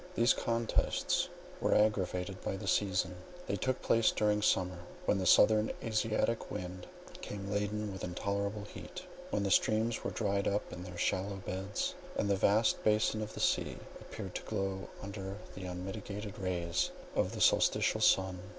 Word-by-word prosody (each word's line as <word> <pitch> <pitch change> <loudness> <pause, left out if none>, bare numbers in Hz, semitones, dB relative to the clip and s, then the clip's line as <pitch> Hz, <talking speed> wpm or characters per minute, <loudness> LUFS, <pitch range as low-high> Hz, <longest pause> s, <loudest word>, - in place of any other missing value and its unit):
These 120 +2 +5
contests 115 -1 0 0.3
were - - +2
aggravated 95 -3 +1
by 95 - -2
the 100 - -7
season: 90 -2 +1 0.3
they - - -1
took 130 0 -1
place 115 -1 +4
during 105 -1 +2
summer, 90 -3 +2 0.3
when 100 - +2
the 95 - 0
southern 110 +4 +6
Asiatic 110 +1 0
wind 90 0 -6 0.3
came 100 -1 -5
laden 105 0 -1
with 95 - -7
intolerable 100 +3 -2
heat, 105 - -9 0.3
when 100 - 0
the 100 - 0
streams 110 +4 +2
were - - -1
dried 100 -2 0
up 100 +1 -1
in 90 - -7
their 90 -1 -8
shallow 95 +3 0
beds, 95 +1 -3 0.2
and 100 - +1
the - - +4
vast 105 +3 +3
basin 110 0 +2
of 105 0 -5
the - - -6
sea - - +1 0.2
appeared - - -7
to - - -3
glow 95 0 -3
under 100 0 -5 0.2
the 95 - -7
unmitigated 100 +3 -5
rays 90 -3 0 0.3
of - - +1
the - - -5
solsticial - - +4
sun. 95 -1 +4
100 Hz, 160 wpm, -33 LUFS, 95-105 Hz, 0.3 s, southern